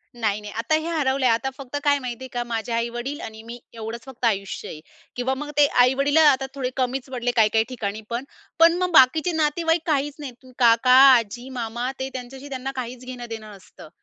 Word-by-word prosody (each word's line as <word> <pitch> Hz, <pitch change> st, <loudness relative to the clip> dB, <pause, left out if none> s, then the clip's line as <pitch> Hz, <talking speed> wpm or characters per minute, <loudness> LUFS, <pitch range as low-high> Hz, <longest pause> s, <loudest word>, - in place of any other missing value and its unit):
नाही, 215 Hz, -3 st, -1 dB
नाही, 210 Hz, 0 st, -8 dB
आता 285 Hz, +8 st, +1 dB
हे 315 Hz, +1 st, -2 dB
हरवलंय. 275 Hz, -5 st, +1 dB
आता 230 Hz, +4 st, +1 dB
फक्त 275 Hz, 0 st, -6 dB
काय 285 Hz, -1 st, +3 dB
माहितीये 255 Hz, 0 st, -6 dB
का? 240 Hz, 0 st, -1 dB
माझे 230 Hz, -1 st, -4 dB
आई-वडील 240 Hz, +4 st, -3 dB
आणि 220 Hz, 0 st, -10 dB
मी 235 Hz, +2 st, -9 dB
एवढंच 225 Hz, +1 st, -6 dB
फक्त 260 Hz, -2 st, -6 dB
आयुष्य 195 Hz, -4 st, -1 dB
आहे. 155 Hz, -, -8 dB, 0.4 s
किंवा 245 Hz, +2 st, -1 dB
मग 295 Hz, +2 st, -6 dB
ते 295 Hz, -, +7 dB, 0.2 s
आई-वडीलं 275 Hz, +4 st, +2 dB
आता 270 Hz, -3 st, +4 dB
थोडे 260 Hz, -2 st, -2 dB
कमीचं 260 Hz, +1 st, -2 dB
पडले 245 Hz, -1 st, -1 dB
काही 220 Hz, -2 st, +5 dB
काही 220 Hz, 0 st, +4 dB
ठिकाणी 220 Hz, -4 st, -4 dB
पण. 235 Hz, +2 st, -3 dB, 0.4 s
पण 330 Hz, 0 st, +7 dB
मग 365 Hz, 0 st, -1 dB
बाकीचे 315 Hz, +3 st, +5 dB
नातेवाईक 325 Hz, +1 st, +1 dB
काहीचं 290 Hz, -2 st, 0 dB
नाहीत. 265 Hz, -3 st, -6 dB
तू 255 Hz, -, -16 dB
काका, 235 Hz, +1 st, +4 dB, 0.3 s
आजी, 240 Hz, +3 st, -5 dB
मामा 235 Hz, +2 st, -3 dB
ते 265 Hz, 0 st, -3 dB
त्यांच्याशी 260 Hz, +2 st, -8 dB
त्यांना 265 Hz, 0 st, -4 dB
काहीचं 250 Hz, 0 st, -6 dB
घेणं-देणं 235 Hz, -4 st, -8 dB
नसतं. 190 Hz, -5 st, -15 dB
255 Hz, 195 wpm, -23 LUFS, 230-275 Hz, 0.4 s, ते